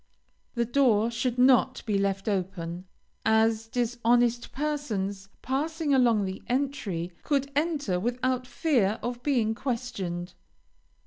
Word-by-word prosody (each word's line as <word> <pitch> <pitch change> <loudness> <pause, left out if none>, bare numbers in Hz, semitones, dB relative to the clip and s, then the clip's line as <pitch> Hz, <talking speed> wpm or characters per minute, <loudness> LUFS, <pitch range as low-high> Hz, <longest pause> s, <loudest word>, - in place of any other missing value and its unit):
The 235 0 +1
door 235 -3 +3
should 240 +1 -1
not 255 +1 +4
be 215 -3 0
left 195 0 -1
open, 185 -3 -3 0.4
as 220 0 +2
dishonest 240 0 +1
persons, 215 -10 -3
passing 300 +3 -1
along 235 -6 +4
the 190 0 -5
entry, 245 -10 -2
could 280 -1 0
enter 290 - 0
without 250 +3 -1
fear 240 -9 +1
of 245 0 -3
being 245 -5 +1
questioned. 200 -8 -4
235 Hz, 115 wpm, -27 LUFS, 200-260 Hz, 0.4 s, not